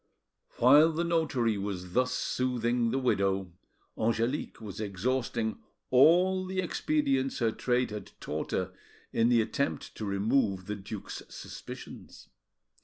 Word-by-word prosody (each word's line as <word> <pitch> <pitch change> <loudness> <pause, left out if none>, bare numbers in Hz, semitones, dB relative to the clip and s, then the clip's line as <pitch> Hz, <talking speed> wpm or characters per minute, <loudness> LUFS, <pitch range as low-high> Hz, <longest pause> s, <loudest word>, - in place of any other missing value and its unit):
While 145 +6 +6
the 165 +2 0
notary 145 -11 +1
was 90 -3 -5
thus 125 +2 +2
soothing 120 -2 0
the 130 - 0
widow, 95 -7 +1 0.4
Angelique 115 +5 -1
was 105 -2 -7
exhausting 110 +2 -1 0.3
all 180 +8 +5
the 190 0 -2
expedients 145 -6 0
her 115 -2 +1
trade 125 0 0
had 105 -1 -6
taught - - -4
her - - -2 0.4
in 115 +1 +3
the 120 -2 +5
attempt 140 +5 -2
to 110 - -4
remove 100 -1 +1
the 105 - -3
duke's 100 +1 -7
suspicions. - - -10
120 Hz, 125 wpm, -30 LUFS, 105-135 Hz, 0.4 s, While